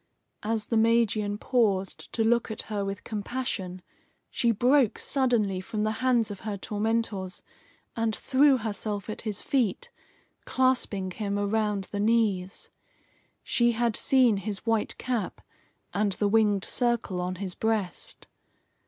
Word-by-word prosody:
As 220 Hz, 0 st, -1 dB
the 230 Hz, -, +2 dB
Magian 220 Hz, -2 st, +2 dB
paused 205 Hz, -6 st, 0 dB
to 225 Hz, -, +1 dB
look 235 Hz, +1 st, +2 dB
at 220 Hz, -, -3 dB
her 205 Hz, -1 st, 0 dB
with 195 Hz, 0 st, -4 dB
compassion, 205 Hz, -5 st, -4 dB, 0.5 s
she 235 Hz, -, +1 dB
broke 245 Hz, +2 st, +3 dB
suddenly 235 Hz, -9 st, +1 dB
from 210 Hz, +3 st, -3 dB
the 215 Hz, -, +1 dB
hands 240 Hz, -4 st, +2 dB
of 200 Hz, -, -7 dB
her 210 Hz, -2 st, -4 dB
tormentors, 210 Hz, -2 st, -2 dB, 0.5 s
and 225 Hz, -2 st, 0 dB
threw 275 Hz, 0 st, +4 dB
herself 210 Hz, -2 st, -3 dB
at -, -, -6 dB
his 215 Hz, -3 st, -4 dB
feet, 245 Hz, -9 st, 0 dB, 0.5 s
clasping 245 Hz, -7 st, +1 dB
him 200 Hz, +1 st, -2 dB
around 205 Hz, 0 st, 0 dB
the 205 Hz, -, -3 dB
knees. 205 Hz, -4 st, +1 dB, 0.7 s
She 240 Hz, -1 st, +2 dB
had 230 Hz, -1 st, +1 dB
seen 255 Hz, -6 st, +4 dB
his 200 Hz, +1 st, -4 dB
white 225 Hz, -2 st, 0 dB
cap 245 Hz, -4 st, -2 dB, 0.5 s
and 205 Hz, -1 st, +1 dB
the 205 Hz, -, 0 dB
winged 205 Hz, -2 st, +3 dB
circle 235 Hz, -7 st, 0 dB
on 180 Hz, +1 st, -2 dB
his 185 Hz, 0 st, -5 dB
breast. 220 Hz, -4 st, -2 dB
215 Hz, 135 wpm, -27 LUFS, 200-235 Hz, 0.7 s, threw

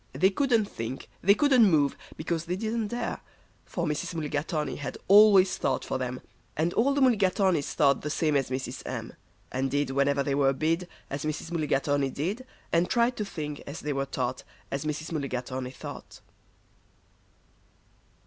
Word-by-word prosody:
They 185 Hz, +9 st, +3 dB
couldn't 235 Hz, -1 st, +2 dB
think, 120 Hz, -, -6 dB
they 200 Hz, +2 st, +5 dB
couldn't 265 Hz, -1 st, +5 dB
move, 145 Hz, -4 st, +3 dB, 0.2 s
because 165 Hz, +1 st, -2 dB
they 175 Hz, +1 st, -2 dB
didn't 220 Hz, +2 st, -2 dB
dare; 240 Hz, +2 st, -3 dB, 0.5 s
For -, -, -3 dB
Mrs. 150 Hz, +3 st, -2 dB
Mulligatawny 150 Hz, -1 st, -2 dB
had 145 Hz, -, -5 dB
always 200 Hz, -2 st, +7 dB
thought 135 Hz, -, -1 dB
for -, -, -2 dB
them, 125 Hz, 0 st, -4 dB, 0.4 s
And 165 Hz, +3 st, +1 dB
all 275 Hz, +5 st, +2 dB
the 285 Hz, -, +1 dB
Mulligatawnys 195 Hz, -, +3 dB
thought 140 Hz, -2 st, +3 dB
the 150 Hz, -, -3 dB
same 155 Hz, 0 st, +1 dB
as 135 Hz, -2 st, +1 dB
Mrs. 130 Hz, -1 st, -4 dB
M., -, -, -5 dB, 0.4 s
And 135 Hz, +1 st, -1 dB
did, 145 Hz, 0 st, 0 dB
whenever 140 Hz, +1 st, +2 dB
they 140 Hz, -, -1 dB
were 135 Hz, -1 st, +3 dB
bid, 165 Hz, +5 st, 0 dB, 0.2 s
As 140 Hz, 0 st, -3 dB
Mrs. 155 Hz, +2 st, -4 dB
Mulligatawny 145 Hz, -3 st, +1 dB
did, 195 Hz, -, -3 dB, 0.3 s
And 170 Hz, +1 st, +3 dB
tried 240 Hz, +1 st, +2 dB
to 210 Hz, -, -1 dB
think, 150 Hz, -6 st, -5 dB
as 140 Hz, +4 st, -6 dB
they 150 Hz, 0 st, -2 dB
were 135 Hz, 0 st, -1 dB
taught, 130 Hz, -1 st, -3 dB, 0.3 s
As 140 Hz, +2 st, -3 dB
Mrs. 155 Hz, +1 st, -3 dB
Mulligatawny 130 Hz, -3 st, -3 dB
thought. 130 Hz, -, -10 dB
150 Hz, 165 wpm, -28 LUFS, 140-190 Hz, 0.5 s, always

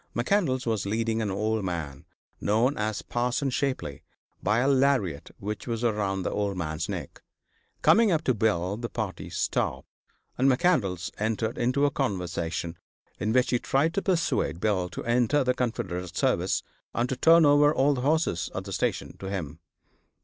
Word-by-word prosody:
McCandlas 130 Hz, 0 st, +1 dB
was 110 Hz, -4 st, -1 dB
leading 115 Hz, +2 st, 0 dB
an 105 Hz, -, -1 dB
old 105 Hz, +2 st, -1 dB
man, 80 Hz, -7 st, -4 dB, 0.3 s
known 115 Hz, +7 st, +2 dB
as 105 Hz, -1 st, -2 dB
Parson 125 Hz, +3 st, -1 dB
Shapley, 130 Hz, -, -2 dB, 0.4 s
by 105 Hz, +3 st, +2 dB
a 125 Hz, +3 st, +2 dB
lariat 130 Hz, -, +2 dB
which 105 Hz, +3 st, -5 dB
was 115 Hz, -1 st, -2 dB
around 100 Hz, -4 st, 0 dB
the -, -, -2 dB
old 100 Hz, -2 st, -1 dB
man's 80 Hz, 0 st, -3 dB
neck. 85 Hz, -9 st, -6 dB, 0.6 s
Coming 225 Hz, -2 st, +5 dB
up 160 Hz, -2 st, +1 dB
to 130 Hz, -, +2 dB
Bill 100 Hz, -3 st, 0 dB
the 115 Hz, 0 st, -4 dB
party 110 Hz, -5 st, -4 dB
stopped, -, -, -1 dB, 0.5 s
and 135 Hz, +2 st, +5 dB
McCandlas 125 Hz, -, +1 dB
entered 110 Hz, +1 st, -1 dB
into 130 Hz, +4 st, +2 dB
a 145 Hz, -, +2 dB
conversation, 85 Hz, -, -2 dB, 0.4 s
in 110 Hz, -, 0 dB
which 125 Hz, +2 st, +3 dB
he 125 Hz, -, +2 dB
tried 145 Hz, +7 st, +1 dB
to 200 Hz, -, 0 dB
persuade 165 Hz, -, 0 dB
Bill 95 Hz, -3 st, 0 dB
to -, -, -7 dB
enter 125 Hz, +4 st, +2 dB
the 125 Hz, 0 st, +2 dB
Confederate 95 Hz, -8 st, -3 dB
service -, -, +1 dB, 0.3 s
and 120 Hz, +1 st, +1 dB
to 130 Hz, -, -2 dB
turn 165 Hz, +4 st, +6 dB
over 145 Hz, 0 st, +6 dB
all 145 Hz, 0 st, +3 dB
the 125 Hz, -, -3 dB
horses 140 Hz, -, +1 dB
at -, -, -3 dB
the -, -, -7 dB
station -, -, -2 dB
to 95 Hz, -, -6 dB
him. 85 Hz, -5 st, -4 dB
110 Hz, 170 wpm, -27 LUFS, 95-130 Hz, 0.6 s, turn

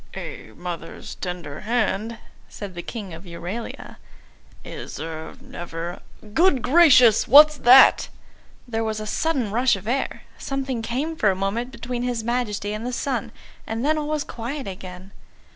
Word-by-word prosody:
"A -, -, -7 dB
mother's 175 Hz, -2 st, -7 dB
tender 175 Hz, -6 st, -6 dB
hand," 225 Hz, -1 st, -1 dB, 0.3 s
said 200 Hz, -3 st, -8 dB
the 175 Hz, -, -6 dB
King 200 Hz, -3 st, -7 dB
of 165 Hz, +4 st, -10 dB
Euralia, 175 Hz, +7 st, -7 dB, 0.7 s
"is -, -, -8 dB
er 160 Hz, +6 st, -7 dB
never 175 Hz, -9 st, -7 dB, 0.3 s
good 315 Hz, -, +3 dB
gracious! 255 Hz, -8 st, +6 dB
What's 300 Hz, +4 st, +8 dB
that?" 255 Hz, +2 st, +7 dB, 0.6 s
There 225 Hz, -1 st, -2 dB
was 220 Hz, -1 st, -2 dB
a 215 Hz, -, -5 dB
sudden 255 Hz, -2 st, -1 dB
rush 240 Hz, +2 st, +3 dB
of 195 Hz, +1 st, -9 dB
air; 265 Hz, +3 st, -2 dB, 0.2 s
something 270 Hz, -3 st, -3 dB
came 265 Hz, +8 st, -2 dB
for 215 Hz, -9 st, +2 dB
a 190 Hz, -, +1 dB
moment 205 Hz, +6 st, -2 dB
between 245 Hz, -2 st, -5 dB
his 245 Hz, -2 st, -2 dB
Majesty 215 Hz, -4 st, -2 dB
and 215 Hz, +1 st, -5 dB
the 250 Hz, -, -3 dB
sun; 250 Hz, -2 st, -2 dB, 0.4 s
and 225 Hz, +3 st, -2 dB
then 310 Hz, +1 st, +3 dB
all 295 Hz, -, -3 dB
was 305 Hz, -1 st, -1 dB
quiet 245 Hz, +3 st, -6 dB
again. 185 Hz, 0 st, -9 dB
230 Hz, 155 wpm, -23 LUFS, 195-260 Hz, 0.7 s, What's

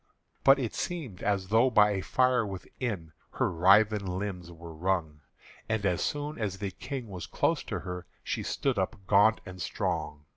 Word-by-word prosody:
But 135 Hz, +1 st, +7 dB
it 125 Hz, -5 st, -2 dB
seemed 150 Hz, -, -4 dB
as 100 Hz, -2 st, 0 dB
though 115 Hz, +4 st, +5 dB
by 105 Hz, -3 st, +5 dB
a 95 Hz, -2 st, -1 dB
fire 125 Hz, +3 st, +2 dB
within 95 Hz, -3 st, -5 dB, 0.2 s
Her -, -, 0 dB
writhen 100 Hz, +4 st, +5 dB
limbs 90 Hz, -2 st, -4 dB
were 85 Hz, -1 st, -10 dB
wrung; 80 Hz, -3 st, -1 dB, 0.5 s
And 110 Hz, -2 st, 0 dB
as 90 Hz, -3 st, +1 dB
soon 145 Hz, 0 st, -2 dB
as 100 Hz, -4 st, -2 dB
the 100 Hz, -1 st, -3 dB
King 125 Hz, +6 st, -6 dB
was 90 Hz, -4 st, -7 dB
close -, -, +1 dB
to -, -, -3 dB
her, 90 Hz, -1 st, -6 dB, 0.2 s
She -, -, -2 dB
stood 130 Hz, -7 st, -1 dB
up 95 Hz, +4 st, -1 dB
gaunt 105 Hz, +3 st, +5 dB
and 90 Hz, -1 st, -8 dB
strong. 75 Hz, -4 st, -3 dB
100 Hz, 175 wpm, -29 LUFS, 90-110 Hz, 0.5 s, But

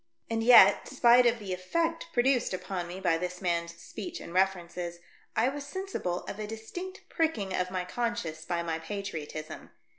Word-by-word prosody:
And 225 Hz, 0 st, 0 dB
yet, 205 Hz, -5 st, +8 dB
spite 245 Hz, -2 st, +6 dB
of 240 Hz, 0 st, +2 dB
the 200 Hz, -4 st, -5 dB
effect 330 Hz, -, -1 dB
produced 245 Hz, -, +2 dB
upon 180 Hz, -1 st, -4 dB
me 180 Hz, +2 st, -7 dB
by 165 Hz, -3 st, +2 dB
this 180 Hz, 0 st, -4 dB
man's 170 Hz, -2 st, -1 dB
speech 340 Hz, -, -7 dB
and 170 Hz, -, -9 dB
references, 175 Hz, -2 st, 0 dB, 0.4 s
I 225 Hz, -, +3 dB
was 285 Hz, +1 st, -5 dB
sensible 290 Hz, -, -3 dB
of 205 Hz, -, -7 dB
a 210 Hz, -, -3 dB
distinct 350 Hz, -, -7 dB
pricking 225 Hz, -, 0 dB
of 180 Hz, 0 st, 0 dB
my 185 Hz, -1 st, -2 dB
con 235 Hz, +5 st, -1 dB
science 160 Hz, -7 st, -5 dB
by 170 Hz, 0 st, -2 dB
my 165 Hz, -1 st, -2 dB
patriotism. 160 Hz, -4 st, -6 dB
195 Hz, 175 wpm, -29 LUFS, 175-240 Hz, 0.4 s, yet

